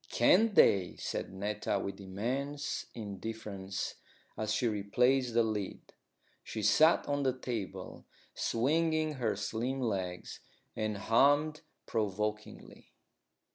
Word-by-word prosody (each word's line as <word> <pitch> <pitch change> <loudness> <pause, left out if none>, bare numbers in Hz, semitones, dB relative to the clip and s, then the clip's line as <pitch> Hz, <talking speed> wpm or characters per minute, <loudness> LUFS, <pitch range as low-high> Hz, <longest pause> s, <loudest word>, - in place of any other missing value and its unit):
"Can't 220 -2 +4
they?" 95 -3 +5
said - - -4
Netta 100 +2 -2
with 100 +1 -5
immense 130 +10 -3
indifference, 100 -2 -5 0.4
as 110 0 -2
she 120 - +1
replaced 120 +4 +1
the 120 - +5
lid. 105 -3 -4 0.5
She 110 - -5
sat 160 - +5
on 145 0 0
the 130 -2 0
table, 115 -6 -5 0.3
swinging 155 +5 +1
her 110 -3 +1
slim 115 +6 -2
legs, 95 -7 -3 0.4
and 110 -1 -2
hummed 145 +8 +3 0.2
provokingly. 105 0 -3
110 Hz, 105 wpm, -32 LUFS, 100-135 Hz, 0.5 s, they